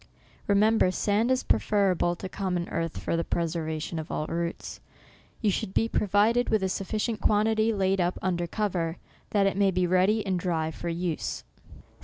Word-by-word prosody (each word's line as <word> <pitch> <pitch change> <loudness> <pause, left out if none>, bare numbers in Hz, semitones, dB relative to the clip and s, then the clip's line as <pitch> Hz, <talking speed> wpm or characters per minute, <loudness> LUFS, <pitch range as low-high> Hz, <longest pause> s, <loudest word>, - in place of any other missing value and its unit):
Remember 210 0 +4
sand 210 +5 +1
is 260 0 +2
preferable 185 -4 +2
to 190 - -6
common 185 -3 -2
earth 165 -1 -3
for - - -2
the 165 - 0
preservation 160 -1 -2
of 155 - -6
all 155 - -2
roots. 170 +1 -4 0.6
You 210 -3 +2
should 190 - -3
be 225 - +3
provided 215 +4 +2
with 215 -3 +2
a 190 - +1
sufficient 215 +4 -2
quantity 220 +1 +2
laid 195 -2 +1
up 175 +1 0
under 175 -2 -1
cover, 175 -4 -2 0.3
that 200 -2 +2
it 195 - +1
may 200 -1 +4
be 180 -1 +1
ready 185 +5 +2
and 185 -2 0
dry 165 -3 -1
for 170 - -5
use. 170 -1 -3
190 Hz, 170 wpm, -27 LUFS, 170-210 Hz, 0.6 s, Remember